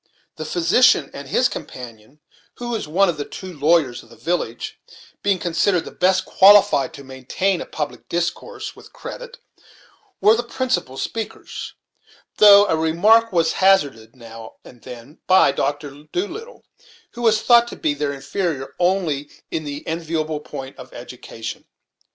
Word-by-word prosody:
The 155 - -5
physician 170 - +3
and 140 0 -8
his 245 - +3
companion, 125 - -10 0.3
who 240 0 -6
was 225 -8 -3
one 190 +6 +3
of 170 -3 -1
the 145 - -3
two 185 +5 -9
lawyers 150 -4 +2
of - - -20
the - - -15
village, 140 -10 -3 0.4
being 200 -2 +1
considered 175 +1 0
the - - -8
best 185 +1 +1
qualified 195 -7 +5
to 140 - -11
maintain 135 +9 -2
a - - -7
public 150 -2 -6
discourse 175 - -4
with - - -16
credit, - - -9 0.8
were 210 +3 +5
the 235 - -1
principal 240 - -2
speakers, 225 +8 -6 0.6
though 205 -1 +8
a 175 - +1
remark 200 +9 +3
was 170 -3 +2
hazarded, 140 -13 +2
now 115 -2 -12
and 120 -2 -15
then, 125 +4 -12
by 185 -7 +5
Mr. 145 +1 -4
Doolittle, 435 - -5 0.5
who 240 - -9
was 220 -2 +2
thought 240 -1 +5
to - - -8
be 150 - -1
their 145 0 -2
inferior 140 0 -4
only 175 -6 0 0.2
in 155 -1 -3
the 145 0 -6
enviable 160 -2 -2
point 135 -3 -9
of 125 -1 -12
education. 120 -2 -8
165 Hz, 150 wpm, -21 LUFS, 140-195 Hz, 0.8 s, though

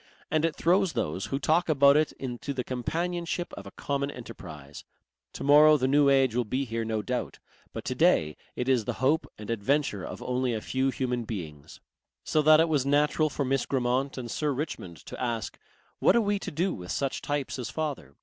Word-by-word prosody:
And 155 0 +2
it 165 - -1
throws 180 0 +2
those 95 - -2
who 135 - -2
talk 160 +5 +1
about 140 -2 +6
it 155 0 +3
into 130 +2 -5
the 125 - -2
companionship 170 +8 -3
of - - -8
a - - -13
common 140 0 -2
enterprise. 75 - -10 0.5
To - - -6
morrow 150 +2 +7
the 130 -2 0
New 140 +1 +4
Age 135 -3 +4
will 125 +1 +1
be 130 +5 -2
here 115 -1 -3
no 110 -1 -2
doubt, - - -3 0.3
but - - -7
today 75 -1 +2 0.2
it 125 - -3
is 125 -5 +2
the - - -2
hope 145 +5 +1
and 105 +1 -6
adventure 115 -2 0
of - - -6
only 125 -1 0
a - - -2
few 130 +4 0
human 125 -2 -2
beings. 80 -10 -7 0.4
So 155 - +2
that 155 +1 +7
it 165 - +4
was 150 -5 +1
natural 150 +2 +2
for 140 -1 -2
Miss 135 0 0
Grammont 130 +1 0
and 120 -3 -5
Sir 150 -1 0
Richmond 110 - -5
to - - -8
ask: 115 -3 -3 0.4
"What - - +4
are - - +5
we 205 -1 0
to - - -5
do 175 +5 -1
with 90 -2 -7
such 135 -1 -2
types 145 -2 -3
as 120 -3 -4
father?" 140 - -4
135 Hz, 205 wpm, -28 LUFS, 115-150 Hz, 0.5 s, morrow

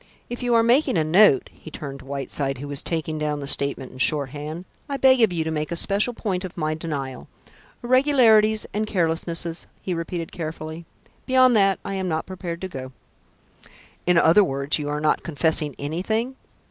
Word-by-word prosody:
If 240 - -5
you 245 -1 +1
are 230 - +5
making 240 - +3
a 160 - +2
note" 160 -2 +4
he - - -12
turned 140 -2 -7
to 130 - -14
Whiteside, 135 0 -3
who 145 +3 -7
was 145 -1 -1
taking 160 -2 -3
down 150 -1 -1
the 140 - -5
statement 140 -2 0
in 130 - -13
shorthand, 150 +4 -1 0.2
"I 280 - -2
beg 260 -2 +5
of 220 -4 +4
you 165 -2 -1
to 160 - -3
make 155 0 -3
a - - -1
special 205 +7 +1
point 190 -5 -3
of 185 -1 -8
my 155 -1 -1
denial. 145 -5 -5 0.6
Irregularities 240 -5 +4
and 215 +1 -1
carelessnesses," 165 -2 -2
he 185 - -3
repeated 165 0 -4
carefully. 160 0 -6 0.4
"Beyond 255 -2 +5
that 195 -2 +4
I - - -4
am 190 -1 -2
not 160 -2 -2
prepared 175 -2 -6
to 190 - -3
go." 130 -6 -8 1.1
"In 180 -1 +4
other 170 +5 +6
words, 140 -2 -1
you 145 -1 -3
are 150 0 -2
not 155 - +1
confessing 155 -2 +1
anything?" 220 - -2
165 Hz, 185 wpm, -23 LUFS, 150-210 Hz, 1.1 s, other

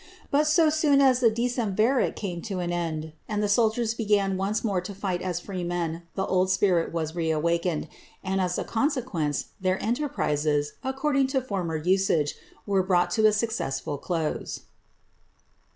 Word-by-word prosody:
But 295 +2 +3
so 310 0 +4
soon 300 -2 +3
as 260 -2 +5
the 240 -3 +5
decemvirate 235 +1 +1
came 180 -4 -4
to 195 - -2
an 175 -1 -2
end, 160 -2 -3 0.2
and 210 -1 -1
the - - +2
soldiers 225 +2 +2
began 205 -4 +1
once 195 +3 -1
more 200 -5 0
to 190 +2 -7
fight 185 -3 -2
as 180 -2 -2
free 185 0 -5
men, 170 -1 -2
the 190 - 0
old 185 0 +1
spirit 185 -3 +2
was 160 -2 -2
reawakened, 165 0 0 0.4
and, 190 0 0
as 180 -1 0
a - - -1
consequence, 225 - -1
their 185 0 +1
enterprises, 150 - 0
according 270 +1 +1
to 265 0 +1
former 190 -9 -3
usage, 170 -3 +2 0.3
were 195 -2 +2
brought 180 -1 +2
to 215 +3 +4
a - - +5
successful 210 - -2
close. 165 -3 -3
190 Hz, 160 wpm, -26 LUFS, 170-230 Hz, 0.4 s, as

